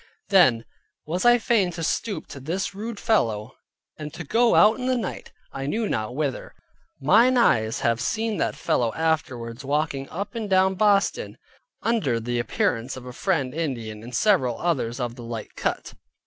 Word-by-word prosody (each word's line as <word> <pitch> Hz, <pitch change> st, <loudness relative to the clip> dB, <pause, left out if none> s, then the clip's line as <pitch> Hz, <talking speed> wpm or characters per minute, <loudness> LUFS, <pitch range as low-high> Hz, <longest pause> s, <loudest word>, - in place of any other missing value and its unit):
Then 130 Hz, -, +5 dB, 0.4 s
was 175 Hz, +7 st, -2 dB
I 240 Hz, 0 st, +7 dB
fain 220 Hz, -5 st, +2 dB
to 165 Hz, -1 st, -5 dB
stoop 210 Hz, +5 st, -2 dB
to 140 Hz, -, -8 dB
this 175 Hz, +9 st, -3 dB
rude 210 Hz, +2 st, -6 dB
fellow, 115 Hz, -, +1 dB, 0.5 s
and 150 Hz, -1 st, -6 dB
to 175 Hz, -, -6 dB
go 230 Hz, +9 st, +3 dB
out 215 Hz, +4 st, +5 dB
in 250 Hz, -, -2 dB
the 255 Hz, -1 st, +2 dB
night, 215 Hz, -6 st, -5 dB, 0.2 s
I 135 Hz, 0 st, -5 dB
knew 220 Hz, +8 st, -1 dB
not 110 Hz, -, -2 dB
whither. 140 Hz, -3 st, -3 dB, 0.4 s
Mine 230 Hz, -, +5 dB
eyes 110 Hz, -, +2 dB
have 115 Hz, 0 st, +1 dB
seen 220 Hz, -, -1 dB
that -, -, -1 dB
fellow 120 Hz, -2 st, 0 dB
afterwards 130 Hz, -7 st, -2 dB
walking 140 Hz, -1 st, -1 dB
up 200 Hz, +7 st, -5 dB
and 225 Hz, -3 st, -4 dB
down 190 Hz, 0 st, +4 dB
Boston, 200 Hz, 0 st, +1 dB, 0.5 s
under 215 Hz, -, +1 dB
the 120 Hz, +1 st, -2 dB
appearance 120 Hz, +2 st, -1 dB
of 130 Hz, -, -10 dB
a 125 Hz, -, -8 dB
Friend 145 Hz, -6 st, -1 dB
Indian, 120 Hz, -10 st, -4 dB
and 120 Hz, +2 st, -8 dB
several 150 Hz, -, +2 dB
others 130 Hz, -8 st, -1 dB
of 120 Hz, -2 st, -2 dB
the 120 Hz, -1 st, -10 dB
like 115 Hz, -2 st, -6 dB
cut. -, -, -3 dB
155 Hz, 175 wpm, -24 LUFS, -, 0.5 s, I